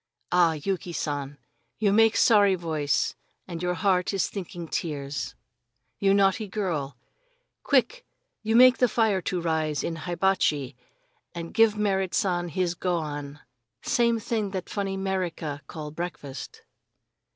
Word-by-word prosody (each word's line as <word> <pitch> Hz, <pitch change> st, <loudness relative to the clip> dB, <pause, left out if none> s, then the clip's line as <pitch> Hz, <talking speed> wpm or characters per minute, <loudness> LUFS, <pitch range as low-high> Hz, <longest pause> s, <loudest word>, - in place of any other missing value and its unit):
"Ah, 175 Hz, -2 st, +4 dB
Yuki 175 Hz, +3 st, -3 dB
San, 145 Hz, -3 st, -3 dB, 0.4 s
you 205 Hz, -2 st, +2 dB
make 225 Hz, +1 st, +5 dB
sorry 205 Hz, -4 st, +5 dB
voice 155 Hz, -5 st, 0 dB, 0.3 s
and 170 Hz, -2 st, -6 dB
your 180 Hz, 0 st, 0 dB
heart 185 Hz, +2 st, +1 dB
is 190 Hz, -, +1 dB
thinking 175 Hz, -3 st, -6 dB
tears. 140 Hz, -6 st, -4 dB, 0.6 s
You 195 Hz, -1 st, +3 dB
naughty 200 Hz, +2 st, +2 dB
girl! 165 Hz, -, -3 dB, 0.6 s
Quick -, -, +1 dB, 0.4 s
you 220 Hz, +1 st, 0 dB
make 255 Hz, +1 st, +7 dB
the 250 Hz, -, +5 dB
fire 220 Hz, -4 st, +1 dB
to 180 Hz, +1 st, -2 dB
rise 160 Hz, -3 st, -1 dB
in 165 Hz, -, -3 dB
hibachi 165 Hz, -6 st, 0 dB, 0.6 s
and 170 Hz, -1 st, -6 dB
give 225 Hz, -1 st, +5 dB
that 210 Hz, -, -8 dB
Merrit 190 Hz, -4 st, 0 dB
San 175 Hz, -2 st, 0 dB
his 175 Hz, +1 st, 0 dB
gohan 150 Hz, -5 st, -3 dB, 0.4 s
same 235 Hz, -4 st, +2 dB
thing 220 Hz, -1 st, -1 dB
what 195 Hz, -, -7 dB
that 185 Hz, -2 st, -4 dB
funny 195 Hz, -1 st, -2 dB
'Merica 180 Hz, -6 st, -3 dB
call 150 Hz, -2 st, -7 dB
breakfast." 155 Hz, -4 st, -7 dB
180 Hz, 140 wpm, -26 LUFS, 155-200 Hz, 0.6 s, make